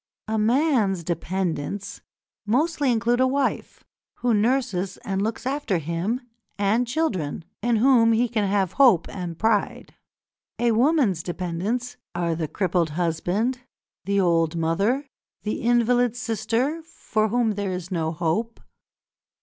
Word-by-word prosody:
A 220 0 0
man's 225 - +2
"dependents" 180 +1 -3 0.5
mostly 290 +3 +2
include 235 +1 +1
a 260 - +4
wife, 270 +1 -2 0.3
who 245 -1 0
nurses 215 -4 0
and 195 -1 -1
looks 220 +4 -3
after 265 -8 0
him, 170 - -2 0.4
and 210 +5 +1
children, 195 - -2 0.2
in 240 +1 +2
whom 230 0 +5
he 235 +2 +3
can 215 -3 0
have 195 -3 +1
hope 240 - +4
and 175 -4 -6
pride. 220 0 0 0.6
A 240 0 +2
woman's 235 - +2
dependents 185 +9 -3 0.2
are 170 -1 0
the 160 -1 -2
crippled 175 -2 0
husband, 175 - -1 0.5
the 200 +1 +1
old 165 -3 +2
mother, 195 - 0 0.4
the 210 - -3
invalid 240 0 +2
sister 230 +6 -1
for 230 -9 -2
whom 235 0 +1
there 200 -2 -2
is 180 0 -5
no 160 -3 -1
hope. 175 +8 -2
215 Hz, 130 wpm, -24 LUFS, 180-245 Hz, 0.6 s, whom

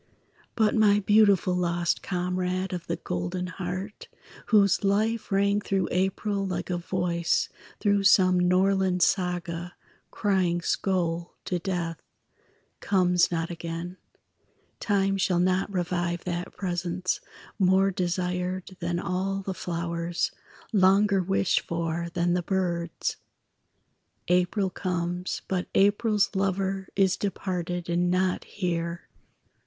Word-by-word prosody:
But 220 -2 +3
my 210 -2 +4
beautiful 205 -3 +4
lost 175 -1 0
comrade 180 +1 -2
Of 175 -1 -5
the 170 - -1
golden 180 +1 -3
heart, 185 +3 -5 0.4
whose 200 -4 +4
life 215 +3 +1
Rang 200 +1 +2
through 195 -3 -1
April 195 +2 0
like 190 -1 -3
a 175 - -1
voice 175 -1 0 0.3
Through 200 -2 +2
some 185 -2 +5
Norland 185 0 +3
saga, 175 -2 -1 0.3
crying 185 -4 +1
Skoal 175 -1 -1
to 180 - -1
death, 175 -2 -3 0.8
comes 180 -3 +3
not 165 0 -2
again; 170 +2 -5 0.8
Time 195 -2 +1
shall 185 -2 +1
not 185 +2 +1
revive 175 -2 -1
that 175 0 -4
presence 180 -1 -2 0.4
More 190 +1 +4
desired 180 +1 -2
than 175 -1 -1
all 190 +2 -2
the 190 - -3
flowers, 170 -1 -2 0.4
Longer 195 0 +4
wished 190 -1 +2
for 170 0 -2
than 175 0 +2
the 180 - +1
birds. 175 -2 -2 1.1
April 180 +2 +2
comes, 180 -1 -3
but 185 -2 -1
April's 205 +1 +3
lover 195 0 -1
Is 195 -2 +3
departed 180 -3 -3
and 175 +1 +1
not 185 0 +1
here. 170 -3 -3
180 Hz, 115 wpm, -27 LUFS, 175-195 Hz, 1.1 s, some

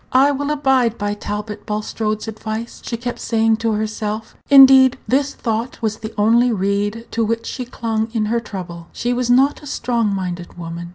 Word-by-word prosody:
"I 270 +3 +5
will 285 +1 -2
abide 265 -6 +2
by 205 -1 -2
Talbot 210 0 -6
Bulstrode's 215 +1 -2
advice," 220 +1 -6
she 235 - -4
kept 245 +1 -5
saying 225 -1 +2
to 225 -1 0
herself; 215 0 -3
indeed, 265 -2 +8
this 280 +2 +1
thought 230 +2 -3
was 215 -1 -1
the 220 0 -7
only 235 +4 +4
reed 205 +2 -1
to 230 - 0
which 230 +1 -1
she 250 - -5
clung 225 -2 -2
in 225 -2 0
her 230 +2 0
trouble. 175 -6 -8
She 245 +1 -1
was 245 0 -1
not 265 +4 +3
a 295 - -10
strong 235 -4 0
minded 180 -3 -4
woman. 170 0 -6
225 Hz, 180 wpm, -19 LUFS, 210-245 Hz, -, indeed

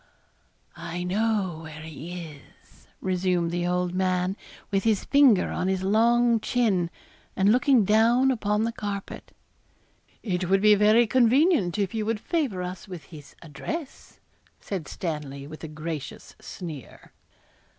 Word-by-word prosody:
'I 170 +1 -5
know 195 -2 0
where 155 -1 -9
he 160 +3 -8
is,' 150 -3 -16
resumed 180 -2 0
the 175 0 -1
old 180 0 0
man, 185 0 0 0.4
with 195 -1 +1
his 220 -3 +1
finger 275 -9 +4
on 180 - -2
his 190 -1 -1
long 230 +3 +3
chin, 210 -8 +1 0.5
and 195 +2 +3
looking 250 -2 +4
down 235 +6 +4
upon 210 -3 0
the 230 - 0
carpet. 205 -3 -6 0.9
'It 180 -4 -2
would 195 0 +4
be 210 0 +7
very 215 +3 +5
convenient 255 - +3
if 200 -3 -1
you 220 -1 -1
would 225 -1 -1
favour 255 - -2
us 180 +2 -7
with 180 -5 -8
his 145 -2 -12
address,' 265 - -7 0.4
said 185 -7 -5
Stanley, 150 -5 -5
with 155 +3 -11
a - - -4
gracious 155 -1 -7
sneer. 160 -8 -9
190 Hz, 140 wpm, -26 LUFS, 175-225 Hz, 0.9 s, be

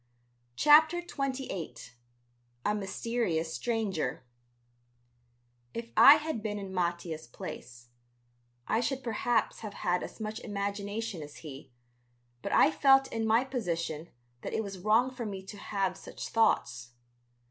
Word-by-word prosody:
CHAPTER 315 - +6
XXVIII 275 - -4 0.9
A 210 - +2
MYSTERIOUS 195 -5 -1
STRANGER 195 - -2 1.5
If 230 0 -5
I 285 - +10
had 305 -6 -3
been 210 -1 -3
in 195 -2 -6
Mattia's 170 -3 -2
place, 120 0 -9 0.8
I 220 - +2
should 265 +2 -1
perhaps 230 0 0
have 215 -2 -7
had 180 0 0
as - - -8
much 215 0 -4
imagination 205 -1 -3
as 145 0 -9
he, 135 -2 -9 0.7
but - - -4
I - - +6
felt 270 +11 +4
in 225 -1 -1
my 225 +3 +4
position 170 - -3 0.3
that - - -5
it 220 - 0
was 195 -2 -7
wrong 220 +7 +3
for 245 -3 -5
me 195 -2 -6
to 200 +2 -10
have 195 -3 -1
such - - -8
thoughts. 125 - +1
210 Hz, 130 wpm, -30 LUFS, 175-235 Hz, 1.5 s, I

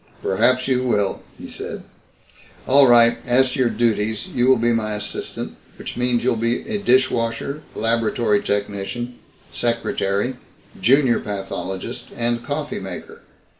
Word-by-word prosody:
"Perhaps 125 +7 +2
you 130 -2 +2
will," 105 -6 0 0.2
he - - -9
said. - - -6 0.8
"All 135 +1 +6
right. 120 -1 +6
As 125 +1 +3
to 140 - -4
your 125 -2 +3
duties 110 -2 0
you 125 0 0
will 130 -1 +6
be 120 +1 +2
my 110 -2 -1
assistant, 105 0 -5 0.2
which - - -7
means 125 -1 +1
you'll 125 - +2
be 115 - 0
a 215 -2 -2
dishwasher, 130 -2 +1
laboratory 115 -1 +1
technician, 105 +4 -3 0.3
secretary, 115 0 -1 0.4
junior 130 +3 +4
pathologist, 95 -2 -5
and 120 0 0
coffee 145 +2 -3
maker. 95 -2 -8
120 Hz, 130 wpm, -21 LUFS, 105-125 Hz, 0.8 s, All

